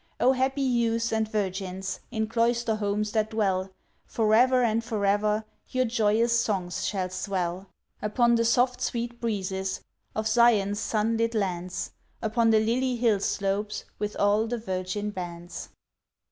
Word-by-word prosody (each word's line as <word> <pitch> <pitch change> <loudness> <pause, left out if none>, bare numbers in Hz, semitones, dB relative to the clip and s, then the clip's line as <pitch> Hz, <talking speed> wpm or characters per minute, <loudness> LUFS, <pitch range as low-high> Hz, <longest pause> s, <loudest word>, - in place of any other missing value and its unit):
O 255 - +5
happy 265 +2 0
youths 230 -2 +1
and 220 -1 0
virgins! 190 -2 -3
In 220 -3 -1
cloister 230 0 +1
homes 210 0 -1
that 215 -1 +1
dwell, 195 -4 0 0.4
For 215 -2 +1
ever 250 +2 +5
and 230 0 +1
for 220 -3 -2
ever 210 +2 +2 0.2
Your 255 0 +1
joyous 230 0 +2
songs 185 -6 -1
shall 185 -3 -2
swell— 185 -1 -3 0.3
Upon 235 +3 +2
the 230 0 +3
soft 250 +2 +2
sweet 235 0 -3
breezes 190 -4 -2 0.3
Of 220 0 -1
Zion's 215 -3 +4
sun 225 +1 0
lit 230 0 0
lands— 180 -3 -2 0.3
Upon 225 +1 +2
the 220 -1 +5
lily 245 +4 +1
hill 230 -4 +2
slopes, 200 +1 -1
With 210 0 -3
all 205 +2 +2
the 240 +1 -2
virgin 195 0 -3
bands. 175 -2 -7
215 Hz, 145 wpm, -27 LUFS, 195-235 Hz, 0.4 s, O